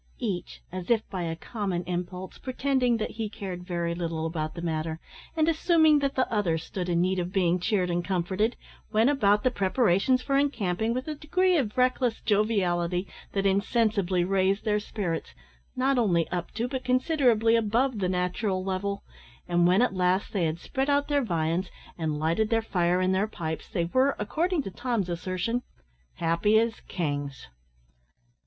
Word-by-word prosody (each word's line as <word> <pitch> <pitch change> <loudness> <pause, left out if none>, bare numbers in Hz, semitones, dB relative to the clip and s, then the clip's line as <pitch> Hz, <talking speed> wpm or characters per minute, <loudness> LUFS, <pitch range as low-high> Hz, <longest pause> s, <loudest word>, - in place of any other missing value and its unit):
Each, 200 -8 -4
as 185 0 -6
if 225 -2 +2
by 185 -3 -3
a 165 -1 -2
common 190 -1 -3
impulse, 180 +1 -5
pretending 255 -2 +1
that 215 - -3
he 220 -1 -4
cared 190 -4 -6
very 170 -2 -2
little 165 -2 -3
about 155 -1 -3
the 170 - -5
matter, 160 -1 -2 0.4
and 315 0 +3
assuming 320 -2 +4
that 275 -1 -1
the 260 - +2
other 185 -7 +1
stood 180 +3 -5
in 170 0 +2
need 185 +1 +1
of 175 0 -3
being 180 -2 +2
cheered 180 -1 0
and 175 0 0
comforted, 190 +5 0 0.4
went 225 +5 +4
about 210 -7 +3
the 255 - +3
preparations 220 +3 +2
for 275 +1 +2
encamping 220 -6 0
with 255 +3 -3
a 310 - -2
degree 355 +5 +1
of 255 -9 0
reckless 250 -2 +2
joviality 185 -4 +1 0.3
that 195 0 0
insensibly 200 -2 +2
raised 195 +2 +1
their 210 -1 +2
spirits, 190 -6 -4 0.4
not 260 0 +2
only 175 -8 +2
up 175 -1 -3
to 235 +3 -1
but 260 0 -4
considerably 255 -4 +3
above 230 +2 +1
the 185 -2 0
natural 185 +2 -1
level; 195 +1 -2 0.4
and 175 0 +3
when 185 +6 +4
at 250 - +1
last 185 +1 +1
they 190 -5 +1
had 160 0 -1
spread 265 +10 -2
out 285 +1 +2
their 285 -1 +2
viands, 170 -2 -1 0.3
and 155 -3 -2
lighted 165 +8 +1
their 225 -1 +2
fire 180 -3 +1
and 185 0 +2
their 195 +3 +1
pipes, 160 -7 -5
they 170 - -1
were, 260 +10 +2
according 320 - 0
to 195 - -6
Tom's 230 -5 -2
assertion, 185 +7 -2 0.5
"happy 170 +6 +2
as 225 0 +1
kings." 145 - -3
195 Hz, 175 wpm, -27 LUFS, 175-240 Hz, 0.5 s, assuming